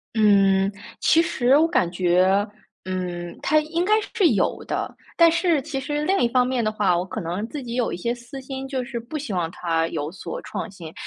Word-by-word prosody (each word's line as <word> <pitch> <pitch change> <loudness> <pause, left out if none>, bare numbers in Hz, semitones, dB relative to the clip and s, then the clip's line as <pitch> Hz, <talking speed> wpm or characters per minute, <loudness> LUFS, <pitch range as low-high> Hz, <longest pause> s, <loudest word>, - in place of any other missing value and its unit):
嗯， 195 -2 +4 0.3
其 330 +1 +4
实 265 -5 +3
我 320 +2 +4
感 180 - +1
觉 185 +3 +2 0.4
嗯， 180 -2 -4
它 310 - +3
应 320 +3 -1
该 415 +4 +2 0.2
是 395 -7 +4
有 - - 0
的， - - -3 0.2
但 335 -1 +7
是 335 -2 +2
其 295 -3 -4
实 295 +2 -2
另 385 +3 +2
一 240 - +3
方 250 +1 +2
面 250 -2 0
的 215 - +1
话， 205 -4 +2
我 175 - 0
可 190 +4 -6
能 180 +4 -3
自 280 +3 -6
己 235 -1 -6
有 245 -1 0
一 - - -4
些 235 +7 -1
私 245 +3 -9
心， 265 0 -6
就 265 -2 -2
是 240 -1 -5
不 240 +7 -6
希 275 -8 -5
望 175 -3 -1
它 165 -2 -1
有 155 -1 -4
所 175 -3 -6
创 - - -5
新。 170 -5 -10
235 Hz, 235 characters per minute, -23 LUFS, 185-285 Hz, 0.4 s, 但